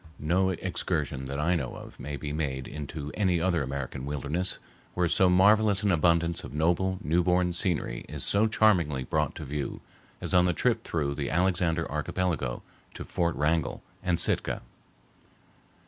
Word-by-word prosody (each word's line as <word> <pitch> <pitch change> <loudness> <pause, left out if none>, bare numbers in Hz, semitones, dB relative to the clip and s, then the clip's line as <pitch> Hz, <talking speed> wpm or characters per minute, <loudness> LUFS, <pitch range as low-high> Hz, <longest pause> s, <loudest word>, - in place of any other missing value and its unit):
No 90 +5 +1
excursion 65 -6 -2
that 70 +2 -4
I 85 +4 +2
know 65 -8 -2
of - - -11
may 70 0 -5
be 75 0 -5
made 65 -4 -2
into 75 0 -6
any 95 -5 +1
other 85 -1 +1
American 65 -1 -4
wilderness 75 +6 -1 0.4
where 90 -1 +2
so 90 +3 +4
marvelous 100 +2 +4
an 100 - +3
abundance 85 +1 +2
of - - -8
noble, 90 +4 +1
newborn 90 +3 +2
scenery 85 -9 -1
is - - -2
so 105 +2 +3
charmingly 85 -11 +2
brought - - -1
to 75 - -7
view 70 +1 -4 0.4
as - - -3
on 90 -1 +5
the 90 - +2
trip - - +1
through 70 -4 -1
the - - -3
Alexander 85 -1 +1
Archipelago 80 -10 -2 0.3
to - - -6
Fort 85 -3 -1
Wrangell 75 0 0 0.2
and 90 -2 0
Sitka. - - +1
85 Hz, 160 wpm, -28 LUFS, 75-90 Hz, 0.4 s, on